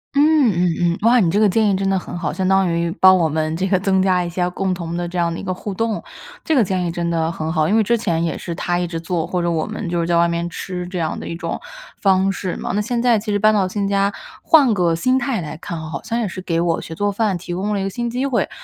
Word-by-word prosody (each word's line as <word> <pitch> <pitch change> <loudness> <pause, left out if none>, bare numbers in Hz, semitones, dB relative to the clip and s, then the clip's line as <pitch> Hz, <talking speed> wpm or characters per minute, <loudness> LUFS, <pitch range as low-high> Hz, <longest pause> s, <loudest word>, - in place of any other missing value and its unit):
嗯 295 -2 +5
嗯 180 -1 +1 0.2
嗯。 170 0 +1
哇， 240 +2 +5
你 180 -7 +3
这 200 +5 +1
个 215 - +5
建 210 +2 +2
议 195 - +2
真 195 0 -1
的 195 - +2
很 175 - -7
好， 170 -3 -2
相 190 -1 -1
当 190 0 +3
于 170 0 0
帮 185 +1 +8
我 170 -3 +2
们 155 +1 -1
这 185 +3 -1
个 190 -1 +2
增 190 0 +2
加 185 -1 +2
一 175 - -4
下 180 +1 -1
共 190 +1 -1
同 170 -1 -4
的 175 0 -2
这 175 +1 -4
样 170 -1 +1
的 165 - -5
一 - - -7
个 185 -1 -2
互 200 +3 -6
动。 220 +2 -2 0.4
这 320 - +1
个 250 - +5
建 185 -2 -1
议 - - -1
真 170 0 -2
的 165 -1 0
很 160 -1 -3
好， 155 -1 +1
因 210 - +3
为 225 - +4
之 235 +4 +2
前 170 -7 -1
也 165 - -1
是 170 - -5
他 175 +1 -1
一 175 - -1
直 165 -1 -4
做， 165 -1 -2
或 180 - -1
者 170 0 0
我 160 -2 -1
们 215 -3 -5
就 170 0 -1
是 165 - -2
在 170 0 +2
外 170 0 +4
面 170 0 -2
吃 180 +1 -5
这 180 - -5
样 160 -2 -2
的 - - -7
一 165 - -4
种 170 - -4 0.4
方 190 -1 +3
式 185 -1 -4
嘛。 - - -4
那 205 - +1
现 235 +3 -2
在 235 -2 +3
其 210 +1 -4
实 205 - +2
搬 215 +1 +4
到 200 -3 +2
新 200 +1 -2
家 200 0 +1 0.3
换 285 -8 +5
个 175 -4 +2
心 255 +10 +2
态 265 -7 -1
来 150 -2 -6
看， 165 0 -6
好 155 -3 -6
像 230 - -2
也 230 - -1
是 185 0 -6
给 170 -2 -1
我 170 -1 0
学 165 - -8
做 205 +3 0
饭 200 -2 0
提 175 0 -7
供 195 +4 -2
了 - - -1
一 - - -2
个 195 - -1
新 240 +5 -3
机 250 +3 -2
会， 265 -4 0
185 Hz, 330 characters per minute, -20 LUFS, 170-205 Hz, 0.4 s, 帮